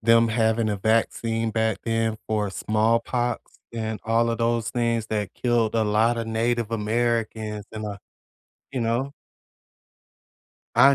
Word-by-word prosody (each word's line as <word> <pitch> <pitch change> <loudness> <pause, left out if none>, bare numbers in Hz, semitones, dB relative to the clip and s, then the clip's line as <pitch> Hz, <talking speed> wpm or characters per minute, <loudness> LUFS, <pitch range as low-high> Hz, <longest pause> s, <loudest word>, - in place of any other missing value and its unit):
them 115 +1 +5
having 110 0 +2
a 100 - -1
vaccine 115 +1 +1
back 110 -2 0
then 115 -1 0
for 105 -2 0
smallpox 115 +4 0 0.2
and 110 -1 -3
all 115 +1 +2
of 115 - -2
those 115 -1 +1
things 115 -2 0
that 105 -3 -2
killed 120 -3 +1
a 115 - +3
lotta 115 +2 +2
native 115 0 0
Americans? 110 -1 -1
Am 110 -1 -4
I 100 -1 -5 0.7
you 130 - -2
know? 120 +4 0 1.6
I 140 0 +7
115 Hz, 130 wpm, -25 LUFS, 110-115 Hz, 1.6 s, I